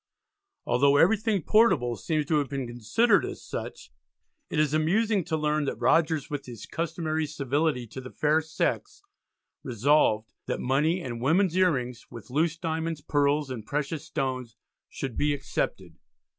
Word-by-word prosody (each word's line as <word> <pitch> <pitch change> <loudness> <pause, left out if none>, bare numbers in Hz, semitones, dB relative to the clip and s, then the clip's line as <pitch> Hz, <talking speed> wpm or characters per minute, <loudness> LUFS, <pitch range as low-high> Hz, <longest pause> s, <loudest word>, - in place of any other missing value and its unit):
Although 140 +3 +3
everything 205 +2 +3
portable 185 - +3
seems 155 +8 -1
to 150 +1 +2
have 145 - -2
been 135 -2 -3
considered 120 - +2
as - - -6
such, - - -7 0.6
it - - -3
is 150 -1 +2
amusing 195 +6 +2
to 160 - -1
learn 150 -1 0
that - - -2
Rogers 155 +3 +2
with 145 -2 -5
his 120 -4 -8
customary 160 -1 -2
civility 145 -2 -1
to 130 +4 -9
the 130 - -9
fair 155 +3 +2
sex, 160 - -3 0.6
resolved 120 -3 +2
"that - - -2
money 150 +7 +1
and 120 -2 -5
women's 170 +6 +2
ear 185 -2 +4
rings, 125 -2 -5
with 120 0 -11
loose 160 +3 +1
diamonds, 160 -1 -3
pearls, 145 -1 +1
and 120 -4 -5
precious 150 +1 -2
stones" 130 -4 -3 0.3
should 135 -4 -5
"be 145 0 +2
excepted." 140 - -4
150 Hz, 155 wpm, -27 LUFS, 130-165 Hz, 0.6 s, ear